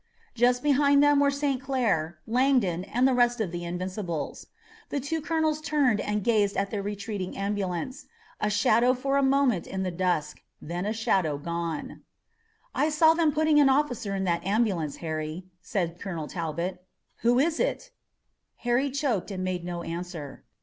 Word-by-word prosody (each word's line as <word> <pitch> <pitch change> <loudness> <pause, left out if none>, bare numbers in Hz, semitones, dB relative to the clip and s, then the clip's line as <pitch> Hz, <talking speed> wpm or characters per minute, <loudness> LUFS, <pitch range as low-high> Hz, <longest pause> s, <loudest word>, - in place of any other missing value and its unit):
Just 245 +1 +2
behind 285 0 +4
them 290 -1 +5
were 285 0 +4
St. 280 -2 -1
Clair, 210 - 0
Langdon 230 -8 +2
and 250 +5 +2
the 265 - +2
rest 240 -1 +3
of 205 -6 -1
the 175 0 -5
Invincibles. 180 -1 -4 0.4
The 285 - -1
two 310 +4 -2
colonels 315 -1 0
turned 285 -8 +2
and 210 -1 -2
gazed 210 -3 +2
at 200 0 -1
the 205 - -2
retreating 200 -1 -4
ambulance, 195 - -3 0.3
a 210 - +1
shadow 220 +5 +3
for 275 +2 0
a - - +3
moment 270 -8 +2
in 190 0 -3
the 185 - -2
dusk, 170 -4 -1 0.2
and 155 - -10
then 175 +2 -2
a - - 0
shadow 190 -9 +1
gone. 170 0 -4 0.7
"I 305 - +2
saw 315 +1 +5
them 325 -2 +2
putting 310 0 +3
an 280 -2 +6
officer 250 -7 0
in 190 - -1
that 170 -2 0
ambulance, 195 -7 0
Harry," 155 +2 -4 0.2
said 175 -3 -2
Colonel 170 -6 -4
Talbot. 170 +2 -4 0.3
"Who 240 +1 +2
was 310 +5 +2
it?" - - -1 0.7
Harry 245 +4 +2
choked 260 -9 -1
and 185 -2 -4
made 185 -1 -2
no 175 -1 -4
answer. 165 -4 -6
210 Hz, 170 wpm, -27 LUFS, 175-270 Hz, 0.7 s, an